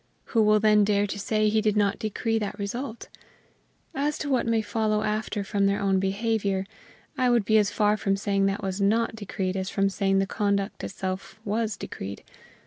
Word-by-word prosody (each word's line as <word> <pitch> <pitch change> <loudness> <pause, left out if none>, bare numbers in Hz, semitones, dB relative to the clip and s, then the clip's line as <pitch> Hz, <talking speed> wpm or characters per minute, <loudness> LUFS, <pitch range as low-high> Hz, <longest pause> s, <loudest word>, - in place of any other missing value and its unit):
Who 225 - +4
will 215 0 +5
then 210 -1 +5
dare 205 0 +2
to 205 0 -5
say 215 +1 +1
he 215 +1 +2
did 215 -1 +1
not 200 -1 +2
decree 225 +1 -1
that 205 -1 -4
result? 230 +4 -5 0.9
As 290 +2 -1
to 285 - -3
what 250 -3 +1
may 225 -1 +2
follow 215 -1 0
after 215 -1 -2
from 200 0 +1
their 200 0 +1
own 195 -1 +2
behavior, 195 0 0 0.5
I 255 -1 +3
would 235 -4 +3
be 220 +2 +5
as 205 -1 +2
far 210 0 +2
from 195 -1 0
saying 200 -1 +1
that 195 +1 -2
was 190 +1 -2
not 225 +3 +2
decreed 190 -3 -3
as 190 0 -2
from 195 -1 +1
saying 195 0 +1
the 195 - +2
conduct 200 0 -1
itself 190 +1 -5
was 215 -1 -1
decreed. 100 - -7
205 Hz, 195 wpm, -26 LUFS, 195-220 Hz, 0.9 s, will